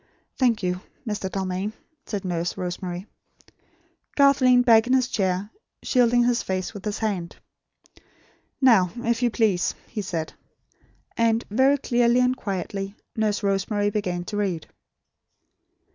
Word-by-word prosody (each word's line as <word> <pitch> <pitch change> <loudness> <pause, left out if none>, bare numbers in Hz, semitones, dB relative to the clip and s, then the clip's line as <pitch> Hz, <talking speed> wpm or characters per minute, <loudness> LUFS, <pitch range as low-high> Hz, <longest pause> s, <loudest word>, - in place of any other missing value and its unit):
"Thank 240 -6 +2
you, 180 0 -1 0.3
Mr. 205 -3 -2
Dalmain," 190 +2 -3 0.3
said 200 -3 -4
Nurse 175 -1 -2
Rosemary. 180 0 -4 1.1
Garth 280 -1 +5
leaned 250 -1 +5
back 225 -1 +6
in 255 - +2
his 255 -1 +3
chair, 195 -2 -1 0.3
shielding 245 -1 +3
his 240 0 +2
face 185 +1 -3
with 200 -2 -9
his 210 -1 -2
hand. 195 -6 -3 1.2
"Now, 225 -9 +5
if 235 0 -1
you 245 - +3
please," 210 -6 +1
he 215 - -5
said. 170 -5 -4 0.8
And, 230 0 +2
very 265 +5 +4
clearly 240 -2 +2
and 250 0 +3
quietly, 195 -1 -4 0.2
Nurse 215 -1 0
Rosemary 205 +1 0
began 180 -4 -2
to 205 +4 -5
read. 185 -6 -1
210 Hz, 130 wpm, -24 LUFS, 185-240 Hz, 1.2 s, back